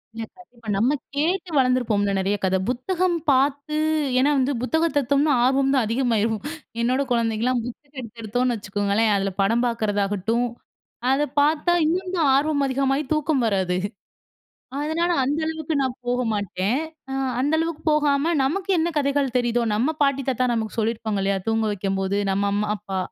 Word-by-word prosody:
இல்ல, 225 - -4
இல்ல. 365 - -18
இப்ப 235 -1 -16
நம்ம 245 +8 +2 0.2
கேட்டு 345 +5 0
வளர்ந்துருப்போம்ல. 245 -6 +2
நிறைய 195 +2 0
கத. 190 0 +2
புத்தகம் 350 +8 0
பார்த்து 285 +3 +1 0.4
ஏன்னா 275 +3 +4
வந்து 260 +2 +1
புத்தகம் 320 +6 +1
எடுத்தோம்னா 280 +3 +2
ஆர்வம் 270 +1 +2
தான் 260 -4 +2
அதிகமாயிரும் 225 -3 0 0.4
என்னோட 255 +3 +1
குழந்தைங்கலாம் 235 +1 +1
புத்தகம் 275 +3 -10
எடுத்து 230 -1 -10
எடுத்தோன்னு 245 +3 0
வச்சுக்கோங்களேன்! 205 +1 0
அதில 195 0 0
படம் 230 +5 +2
பார்க்கறதாகட்டும், 215 0 0 0.7
அத 270 - +2 0.2
பார்த்தா 310 +4 +2
இன்னும் 365 +3 -1
தான் 310 -5 +3
ஆர்வம் 285 0 +1
அதிகமாக 270 +2 0
தூக்கம் 305 -4 +1
வராது 190 -3 0 1.0
அதனால 320 +4 0
அந்த 285 +4 0
அளவுக்கு 320 -1 -3
நான் 260 -2 -1
போக 245 +1 0
மாட்டேன். 200 +1 -1 0.3
ஆ - - -4 0.3
அந்த 285 +4 +1
அளவுக்கு 325 -1 -2
போகாம 300 +1 +2
நமக்கு 375 +9 -1
என்ன 330 +1 +1
கதைகள் 280 -2 0
தெரியுதோ! 240 0 +1
நம்ம 255 +9 +1
பாட்டி, 275 -1 +2
தாத்தா 255 -1 +1
நமக்கு 220 -2 -3
சொல்லியிருப்பாங்க 220 -2 -1
இல்லயா! 195 0 +1
தூங்க 225 0 +1
வைக்கும்போது, 195 0 -1
நம்ம 200 +1 0
அம்மா, 205 +1 0
அப்பா, 195 -2 -5
250 Hz, 155 wpm, -23 LUFS, 215-290 Hz, 1.0 s, ஏன்னா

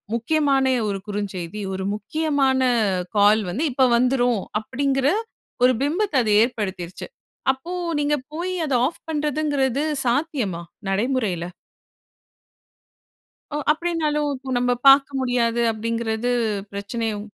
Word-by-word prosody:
முக்கியமான 275 +2 +2 0.2
ஒரு 195 - -2
குறுஞ்செய்தி, 200 -2 -4
ஒரு 190 0 -3
முக்கியமான 275 +2 0 0.6
கால் 210 +2 +5
வந்து, 255 - -1
இப்ப 260 0 +4
வந்துரும். 245 -3 +2 0.2
அப்படிங்கிற 270 +3 0 0.6
ஒரு 255 - +6
பிம்பத்த 340 +6 0
அது 215 - +1
ஏற்படுத்திருச்சு. 190 -7 -5 0.5
அப்போ, 270 +7 -9 0.3
நீங்க 295 0 +1 0.2
போய் 360 +3 -3
அத 275 - -1
ஆஃப் 330 - -11
பண்றதுங்கிறது 290 -3 0 0.2
சாத்தியமா? 240 - -1 0.3
நடைமுறையில? 210 -4 0 2.1
ஒ, 295 - -3 0.2
அப்படினாலும் 305 -3 -1 0.3
"நம்ம 245 0 +1 0.2
பார்க்க 275 0 +5
முடியாது" 240 -2 +1
அப்படிங்கிறது 230 +1 -2 0.4
பிரச்சனையோ? 210 +1 -3
255 Hz, 100 wpm, -23 LUFS, 215-290 Hz, 2.1 s, ஒரு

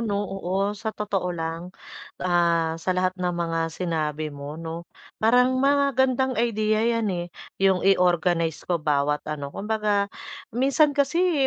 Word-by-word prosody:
'no 205 -3 -1
oo, 195 +1 -2
sa 220 +1 -4
totoo 195 -3 -1
lang, 165 0 -4 0.6
ah, 170 -2 +2
sa 185 - -1
lahat 185 0 +1
ng 180 -1 0
mga 165 -1 -1
sinabi 155 -3 -3
mo 145 +2 -7
'no, 165 +1 -7 0.3
parang 250 +3 +4
magandang 265 -2 +2
idea 215 -2 +1
'yan, 230 -1 +1
eh, 175 -1 -3 0.3
yung 190 -2 +3
i-organize 175 -3 +2
ko 175 -3 -1
bawat 150 -1 +1
ano, 145 -2 -5
kumbaga 210 -1 0 0.5
minsan 280 +3 +3
kasi, 300 +1 +2
185 Hz, 135 wpm, -25 LUFS, 165-230 Hz, 0.6 s, parang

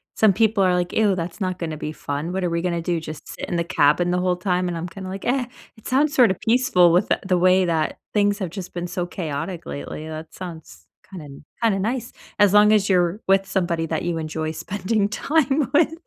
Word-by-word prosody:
some 215 -2 +5
people 215 0 +2
are 180 -1 +3
like, 180 0 -1
"Ew, 210 -3 +3
that's 180 +4 -5
not 185 -1 -1
gonna 160 -2 -3
be 150 - -4
fun. 150 +2 -4
What 190 0 -2
are 175 - +1
we 170 0 -1
gonna 170 -1 -1
do? 170 -1 0
Just 155 -1 -9
sit - - -6
in - - -2
the 170 - +1
cabin 170 +2 +2
the 180 - +1
whole 180 0 +1
time?" 180 -1 0
and 170 - -3
I'm 165 +2 -4
kinda 190 +2 -8
like, 195 +1 -6
"Eh, 250 0 +1 0.3
it 220 - -11
sounds 285 +3 +2
sort 250 -5 +6
of 185 - -4
peaceful," 225 -8 +4
with 180 +4 +2 0.2
the 185 -2 +2
way 185 +1 +4
that 160 -3 -1 0.2
things 205 0 +2
have 185 -4 -3
just 185 -1 -7
been 175 0 -4
so 175 0 -3
chaotic 170 0 -5
lately; 70 - -6
that 160 0 -8
sounds 160 - -10 0.2
kinda 150 -8 -10 0.2
kinda 220 -4 +2
nice, 235 +4 -2 0.3
as 205 -1 +5
long 210 0 +6
as 205 -2 +3
you're 180 +1 +2
with 195 0 +3
somebody 175 -4 -1
that 160 -1 -2
you 175 -1 -1
enjoy 155 0 -3
spending 200 +5 -1
time 280 +3 +1
with. 315 +1 +4
180 Hz, 230 wpm, -22 LUFS, 170-205 Hz, 0.3 s, sort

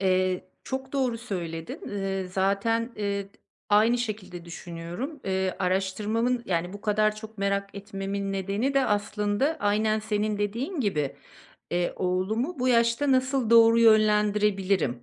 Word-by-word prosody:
Eee, 185 -1 +1 0.2
çok 265 0 -5
doğru 255 -4 0
söyledin. 170 -8 -5
Eee, 195 -2 -2
zaten, 200 +5 0
eee, 200 -1 -2
d - - -19 0.4
aynı 220 +4 +4
şekilde 210 -7 -5
düşünüyorum. 175 - -6
Eee, 190 -1 -1
araştırmamın, 210 +6 0
yani, 175 0 -1
bu 205 - -8
kadar 215 0 +1
çok 220 0 -10
merak 200 0 -1
etmemin 195 0 -4
nedeni 200 +8 -1
de 270 -1 +4
aslında 210 +7 0
aynen 215 +1 +2
senin 215 -1 -1
dediğin 235 - -2
gibi, 150 - -1 0.5
eee, 175 0 0
oğlumu 215 - -1
bu 255 - +1
yaşta 235 +3 +3
nasıl 260 -2 +1
doğru 230 0 +7
yönlendirebilirim, 210 - +3
205 Hz, 130 wpm, -27 LUFS, 190-230 Hz, 0.5 s, doğru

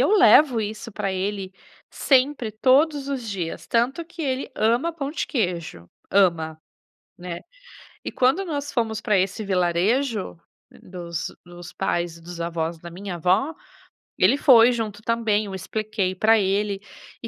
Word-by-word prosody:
eu 275 - +3
levo 290 - +6
isso 215 +2 -5
pra 195 -1 -3
ele 190 0 -3 0.4
sempre, 265 -3 +1
todos 275 +6 +2
os 260 -5 -4
dias, 180 -5 -5
tanto 255 +8 +1
que 335 +1 -12
ele 270 -3 -2
ama 235 +10 +1
pão 290 -3 -5
de - - -2
queijo. 170 - -3 0.2
Ama, 165 -5 +2 0.6
né. 175 -1 -6 0.6
E - - -4
quando 265 +10 +2
nós 290 -4 -4
fomos 220 -3 -1
pra 215 -3 +2
esse 195 +4 -1
vilarejo, 195 +4 0 0.4
dos 170 -2 -6
dos 175 0 -11
pais 170 -3 -2
dos 170 +1 -9
avós 170 0 -3
da 170 +1 -10
minha 185 +1 -6
avó, 190 - +1 0.7
ele 205 +10 +4
foi 250 -5 +7
junto 215 -4 -4
também, 220 -2 0
eu 195 -1 -6
expliquei 205 -1 -2
pra 220 +4 +4
ele, 200 +1 0 0.4
e - - -4
210 Hz, 145 wpm, -23 LUFS, 180-255 Hz, 0.7 s, foi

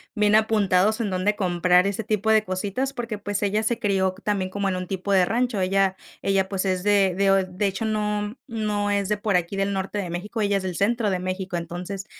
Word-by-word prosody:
bien 210 -1 +3
apuntados, 215 -1 +3
en 215 - -1
donde 190 +3 0
comprar 180 -1 +3
ese 200 +2 -2
tipo 215 +1 +1
de 215 -1 +4
cositas, 205 +8 -2
porque, 235 -4 -4
pues, 205 0 -3
ella 205 +2 +1
se 230 +1 0
crió 190 -4 0
también 195 -3 -1
como 200 0 -1
en 185 - -1
un 185 -1 -5
tipo 195 +1 -3
de 185 -2 +5
rancho. 235 +1 0
Ella 190 0 +1 0.2
ella, 195 -1 +1
pues, 190 -1 -2
es 185 -2 -1
de 200 -2 +3
de 195 +2 +2
o 195 0 +4
de 185 +2 -3
hecho, 195 +2 -3
no 210 +1 -1
no 210 -3 -1
es 200 -1 0
de 210 - +1
por 205 -2 0
aquí, 180 +2 0
del 195 0 0
norte 195 +2 -3
de 190 -4 -3
México, 190 +7 -5
ella 205 -1 +1
es 195 - -4
del 180 -3 -3
centro 225 +1 +1
de 185 -2 -1
México, 185 0 -3
entonces, 180 +3 -5
200 Hz, 230 wpm, -24 LUFS, 185-210 Hz, 0.2 s, de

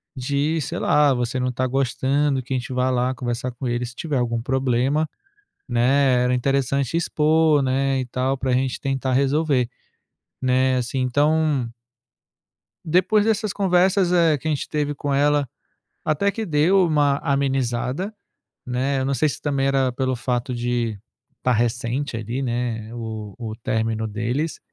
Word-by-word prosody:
de, 145 +5 0
sei 135 - -4
lá, 150 -2 +4
você 125 0 -2
não 125 0 0
tá 130 +1 -1
gostando 135 +2 0
que 130 +1 -5
a - - +1
gente 125 +1 -5
vai 125 0 +1
lá 125 +1 +1
conversar 125 0 -3
com 125 +2 -5
ele. 120 +1 -1
Se 120 - -9
tiver 150 0 -3
algum 120 -1 -1
problema, 130 +4 +1 0.6
né. 125 +1 +3
Era 125 0 +2
interessante 135 +3 0
expor, 155 -2 +3
né. 135 +1 +1
E 130 - -2
tal, 130 +2 -1
para 130 0 -2
a 125 - +3
gente 130 0 0
tentar 135 -2 -1
resolver, 140 -2 +2 0.7
né". 130 0 +2
Assim, 125 +2 -2
então 145 0 +2 1.2
Depois 185 +6 +3
dessas 215 -2 +1
conversas, 185 -1 +2
eh, 165 -4 +4
que 155 - -6
a 155 - +1
gente 145 - -4
teve 145 -1 -1
com 140 0 -2
ela, 145 0 +2 0.6
até 155 +7 +1
que 220 +2 -4
deu 175 +5 +3
uma 145 -3 +2
amenizada, 135 - -1 0.5
né. 130 +2 -1
Eu 130 - -1
não 140 - 0
sei 150 +4 +2
se - - -6
também 140 -2 0
era 135 -2 +2
pelo 130 +1 -1
fato 125 +1 -2
de 120 -2 -1 0.4
tá 125 - +1
recente 120 +3 -1
ali, 115 +4 -4
né, 120 -3 -3
o 110 -3 -6
o 110 -3 -5
término 110 0 -1
deles, 120 +9 -2
130 Hz, 165 wpm, -22 LUFS, 125-145 Hz, 1.2 s, lá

